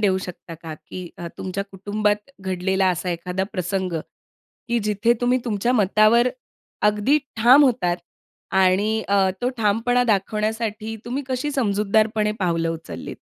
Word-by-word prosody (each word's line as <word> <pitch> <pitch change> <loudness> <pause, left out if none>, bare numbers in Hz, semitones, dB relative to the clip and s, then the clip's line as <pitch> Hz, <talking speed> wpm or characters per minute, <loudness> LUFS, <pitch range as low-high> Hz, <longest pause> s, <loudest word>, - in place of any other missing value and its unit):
देऊ 190 -3 +2
शकता 180 -2 -8
का, 160 -1 -8
की 175 +3 -9
अ, 170 - -5
तुमच्या 190 +1 -3
कुटुंबात 205 +3 -2
घडलेला 190 +1 0
असा 180 +1 -2
एखादा 180 +2 -2
प्रसंग, 185 0 -2 0.8
की 235 0 +2
जिथे 210 +3 +2
तुम्ही 245 +1 +2
तुमच्या 230 +1 0
मतावर 215 +2 +4 0.5
अगदी 210 +8 +3 0.2
ठाम 250 +6 +7
होतात 220 -10 +1 0.6
आणि 195 +4 +3
अ, 195 -1 +3
तो 250 - +2
ठामपणा 230 +3 +2
दाखवण्यासाठी 215 +1 -1
तुम्ही 255 +4 -3
कशी 260 +3 -1
समजूतदारपणे 215 -2 +1
पावलं 165 -2 +1
उचललीत? 95 - -7
205 Hz, 130 wpm, -22 LUFS, 185-225 Hz, 0.8 s, ठाम